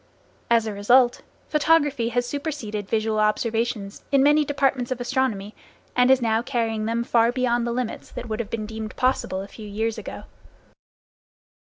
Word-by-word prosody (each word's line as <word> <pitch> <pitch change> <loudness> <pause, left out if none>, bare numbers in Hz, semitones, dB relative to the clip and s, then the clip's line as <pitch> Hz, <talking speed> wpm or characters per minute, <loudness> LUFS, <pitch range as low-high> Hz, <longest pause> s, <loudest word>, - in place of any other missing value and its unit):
As 230 -1 +4
a 215 - -3
result, 240 +5 +4 0.3
photography 295 -6 +2
has 245 +1 0
superseded 245 -7 -4
visual 220 -1 0
observations, 215 -1 -1
in 275 -1 +5
many 295 +1 +5
departments 270 -3 0
of 255 -1 -3
astronomy, 240 -5 -1 0.4
and 250 +1 +4
is 265 -2 +5
now 225 0 +2
carrying 230 -4 -1
them 230 +1 0
far 235 0 +3
beyond 240 -2 0
the - - -1
limits 245 -1 -4
that 245 - -6
would 215 0 -3
have 225 -3 -3
been 225 -2 -3
deemed 220 0 -6
possible 250 -7 0
a - - -9
few 215 +1 -10
years 220 +2 -2
ago. - - -8
235 Hz, 165 wpm, -24 LUFS, 220-255 Hz, 0.4 s, in